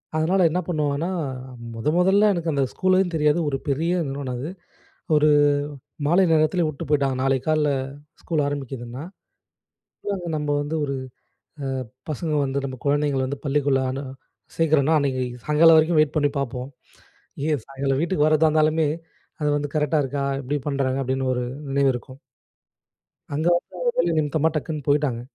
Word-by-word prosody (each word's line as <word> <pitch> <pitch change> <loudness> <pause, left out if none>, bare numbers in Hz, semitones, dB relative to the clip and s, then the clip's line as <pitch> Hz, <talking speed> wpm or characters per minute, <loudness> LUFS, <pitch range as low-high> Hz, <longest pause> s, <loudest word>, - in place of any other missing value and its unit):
அதுனால 175 +5 +2
என்ன 180 +3 0
பண்ணுவாங்கன்னா, 150 0 -1 0.6
மொத 115 +5 -5
முதல 195 +4 +4
எனக்கு 170 -2 -1
அந்த 140 -1 +2
ஸ்கூலையும் 185 -1 +2
தெரியாது. 150 +2 +3
ஒரு 135 - -1
பெரிய 160 +5 0 0.2
நிறுவனம் 135 -2 -4
அது. 150 +6 -4 0.7
ஒரு 150 0 +4 0.8
மாலை 175 +5 +4
நேரத்துலேயே 160 +2 +3
விட்டு 155 +2 -5
போய்ட்டாங்க. 140 -3 +2
நாளைக்கு 135 -1 +1
காலையில் 150 -2 +2 0.5
ஸ்கூல் 155 -4 0
ஆரமிக்குதுன்னா, 135 -2 -5 1.3
நம்ப 150 -1 -2
வந்து 150 +2 -4
ஒரு 140 -1 -2 0.9
அ - - -21 0.2
பசங்க 155 +2 -3
வந்து 135 +1 -2
நம்ப 130 -1 -4
குழந்தைங்கள 145 -1 +1
வந்து 140 +1 -4
பள்ளிக்குள்ள 140 -1 +2
அனு 135 +2 -4 0.5
சேர்க்குறோம்னா, 155 -1 +3
அன்னைக்கு 130 -3 0 0.2
சாயங்காலம் 160 +2 +6
வரைக்கும் 160 0 +3
வெயிட் 155 +1 +1
பண்ணி 145 -1 +3
பாப்போம். 130 -1 -3 0.8
ஏன் 150 -6 0
சாயங்காலம் 135 0 -1
வீட்டுக்கு 170 -3 +2
வரதா 155 +1 +4
இருந்தாலுமே, 155 0 +2 0.5
அது 150 - +1
வந்து 145 0 -3
கரெக்டா 150 0 +2
இருக்கா 140 +1 -2 0.2
எப்படி 145 +3 -2
பண்ணுறாங்க? 135 -1 0
அப்டீன்னு 130 0 -1
ஒரு 125 - -1 0.3
நினைவு 135 -1 +3
இருக்கும். 130 +2 -9 1.1
அங்க 155 +4 0
வந்து - - -10 0.2
வேலை - - +2
நிமித்தமா 155 +1 +2
டக்குன்னு 155 -2 -3
போயிட்டாங்க. 140 -5 +1
145 Hz, 145 wpm, -23 LUFS, 135-155 Hz, 1.3 s, சாயங்காலம்